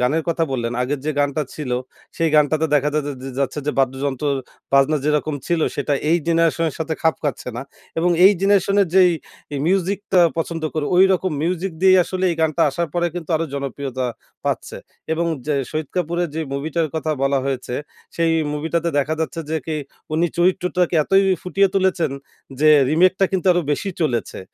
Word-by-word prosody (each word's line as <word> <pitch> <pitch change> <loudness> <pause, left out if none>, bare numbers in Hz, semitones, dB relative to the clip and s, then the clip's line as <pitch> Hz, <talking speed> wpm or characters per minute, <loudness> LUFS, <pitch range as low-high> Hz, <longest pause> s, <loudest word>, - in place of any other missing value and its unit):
গানের 145 +6 +1
কথা 165 0 +1
বললেন 120 -2 -2
আগের 135 +2 -2
যে - - +2
গানটা 145 +2 0
ছিলো 130 -5 -2 0.4
সেই 165 -1 +2
গানটাতে 155 +1 +3
দেখা 145 0 +3
যা 155 - +2 0.4
যাচ্ছে 140 +2 -1
যে, - - +2
বাদ্যযন্ত্র 135 +1 0 0.5
বাজনা 140 +3 +4
যেরকম 150 0 +1
ছিল 170 -2 +1 0.2
সেটা 145 0 0 0.2
এই 170 - +4
জেনারেশনের 165 -2 +2
সাথে 160 0 -2
খাপ 160 -1 +3
খাচ্ছে 145 -3 -3
না। 125 - -4 0.4
এবং 175 +2 +2
এই 195 - +9
জেনারেশনের 200 0 +3
যেই 185 -2 +6 0.6
মিউজিকটা 195 +1 +1 0.2
পছন্দ 165 0 -3
করে 155 -2 -1
ঐরকম 185 -1 +4
মিউজিক 180 +2 -1
দিয়েই 185 -1 +6
আসলে 185 0 -3
এই 165 - -2
গানটা 160 +1 +2
আসার 170 +4 -2
পরে 175 0 +1
কিন্তু 175 -2 -6
আরও 165 - -2
জনপ্রিয়তা 135 -2 -3 0.4
পাচ্ছে। - - -2 0.4
এবং 170 +1 0 0.2
জা 150 - +1 0.2
শহীদ 155 -2 -3
কাপুরের 175 0 0
যে 160 - -2
মুভিটার 155 +3 -1
কথা 160 0 -1
বলা 135 0 +2
হয়েছে 130 -2 -3 0.4
সেই 165 -1 +2 0.2
মুভিটাতে 160 +3 -1
দেখা 145 +3 0
যাচ্ছে 165 +1 -2
যে, 160 - 0
কি 155 - -2 0.4
উনি 165 +2 +2
চরিত্রটাকে 180 0 +1
এতই 195 0 +4 0.2
ফুটিয়ে 195 +2 +2
তুলেছেন 185 -5 +1 0.5
যে 155 - +5 0.2
রিমেকটা 185 +4 +4
কিন্তু 190 -1 -1
আরো 175 - +1
বেশি 195 +6 -2
চলেছে 120 -10 -2
160 Hz, 170 wpm, -21 LUFS, 145-180 Hz, 0.6 s, এই